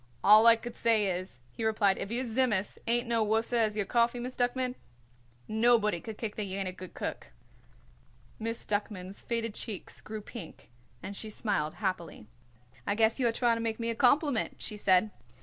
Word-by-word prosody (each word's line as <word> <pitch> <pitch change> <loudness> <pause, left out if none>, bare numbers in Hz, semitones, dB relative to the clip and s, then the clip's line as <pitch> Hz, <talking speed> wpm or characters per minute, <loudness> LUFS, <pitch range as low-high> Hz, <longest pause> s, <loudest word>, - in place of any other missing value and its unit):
"All 215 +2 +8
I 230 - +9
could 235 +1 -8
say 225 -3 +2
is," 185 -7 -3
he 225 - -6
replied, 210 -3 +2
"if - - -4
your 245 +2 0
Tzimmus 225 -5 0
ain't 240 +1 +3
no 230 -1 +2
worser 225 +3 +1
as 215 -2 +1
your 205 - 0
coffee, 235 +3 +2
Miss 250 +1 -5
Duckman, 250 +1 0 0.7
nobody 220 -4 +3
could 220 -2 -8
kick 220 -3 -4
that 210 - -1
you 190 0 -4
ain't 195 -1 -1
a - - -2
good 185 0 -11
cook." - - -5 1.1
Miss 230 +1 -4
Duckman's 205 -2 -3
faded 230 -2 -2
cheeks 210 -3 -6
grew 215 0 -7
pink 200 - -10 0.3
and 200 - -6
she 220 - -5
smiled 200 -8 -2
happily. 185 - -3 0.6
"I 205 - +1
guess 225 +3 +2
you 250 - +3
are - - +2
trying 235 0 +2
to - - -3
make 225 0 -2
me 230 0 -1
a - - -4
compliment," 280 0 +2
she 210 - -5
said. 200 0 +3
220 Hz, 190 wpm, -30 LUFS, 205-235 Hz, 1.1 s, I